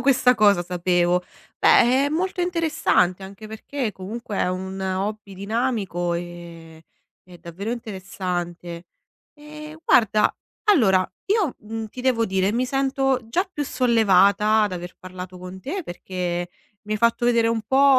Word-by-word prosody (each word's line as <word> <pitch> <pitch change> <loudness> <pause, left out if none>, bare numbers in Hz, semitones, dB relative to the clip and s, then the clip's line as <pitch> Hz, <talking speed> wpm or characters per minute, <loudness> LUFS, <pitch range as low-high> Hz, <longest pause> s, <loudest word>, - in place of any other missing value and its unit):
questa 250 -1 +4
cosa 205 -4 +4
sapevo. 180 0 +1 0.3
Beh, 260 +4 +5
è - - 0
molto 360 +5 -1
interessante, 320 - +1
anche 200 +3 -10
perché 230 +3 -4
comunque 210 +3 -6
è - - +1
un 190 +1 -4
hobby 195 +2 -3
dinamico 200 -4 -1
e 170 -2 -8 0.4
è 180 -1 -15
davvero 185 +7 -5
interessante. 180 -5 -5 0.5
Ehm, 305 +1 -10
guarda, 215 -6 +4 0.4
allora 190 - +4 0.2
io, 400 - +1
mhmm, 220 +1 -6
ti 250 - -9
devo 250 -3 +2
dire, 190 0 +1
mi 245 +3 0
sento 270 0 +1
già 355 +11 +1
più 295 - -2
sollevata 215 -4 +4
ad 205 - 0
aver 175 0 -6
parlato 185 0 -9
con 185 +1 -9
te 345 - -4
perché 175 - -4 0.3
mi 210 0 -5
hai 215 - -1
fatto 235 +1 +2
vedere 235 -1 +3
un 225 -1 0
po', 270 +3 +5
210 Hz, 145 wpm, -23 LUFS, 180-250 Hz, 0.5 s, Beh